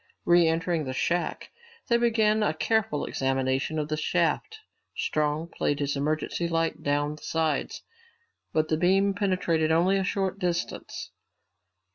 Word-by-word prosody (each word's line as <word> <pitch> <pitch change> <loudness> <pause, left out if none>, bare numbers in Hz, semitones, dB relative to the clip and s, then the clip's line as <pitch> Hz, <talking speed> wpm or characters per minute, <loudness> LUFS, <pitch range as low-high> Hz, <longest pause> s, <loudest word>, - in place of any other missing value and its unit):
Re 175 -1 +5
entering 165 -1 0
the 130 0 -4
shack, 175 +6 -1 0.4
they 235 - +3
began 220 -2 +2
a 210 - +1
careful 215 -5 0
examination 135 +3 -1
of 150 -1 -1
the 155 0 -2
shaft. 440 - 0 0.4
Strong 155 +2 -1
played 145 - 0
his 145 0 -1
emergency 155 +4 -1
light 165 -1 -1
down 145 +1 0
the - - -16
sides, 160 -1 -1 0.7
but 155 0 +1
the 155 - +2
beam 195 +4 +3
penetrated 185 -5 +1
only 180 +4 +3
a 195 - 0
short 195 0 -1
distance. 175 -2 -3
165 Hz, 140 wpm, -27 LUFS, 150-190 Hz, 0.7 s, Re